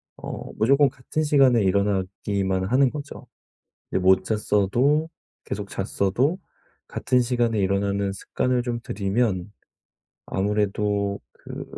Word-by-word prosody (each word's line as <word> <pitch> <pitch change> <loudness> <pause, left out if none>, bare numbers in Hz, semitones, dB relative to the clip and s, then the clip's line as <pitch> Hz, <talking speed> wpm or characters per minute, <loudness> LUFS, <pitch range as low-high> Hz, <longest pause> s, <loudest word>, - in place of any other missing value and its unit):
어 - - -7
무조건 140 +6 +4
같은 130 +4 -3
시간에 135 -6 +4
일어나기만 95 -1 0
하는 130 +7 +3
거죠. 145 +1 -8 0.7
이 - - +2
못 95 0 +4
잤어도 115 - +1 0.3
계속 - - -5
잤어도 125 - 0 0.5
같은 125 - +1
시간에 120 -2 +1
일어나는 100 0 0
습관을 125 +5 -1
좀 120 -1 -3
들이면 100 -2 -1 0.7
아무래도 100 0 0
그 - - -9
105 Hz, 250 characters per minute, -24 LUFS, 100-125 Hz, 0.7 s, 무조건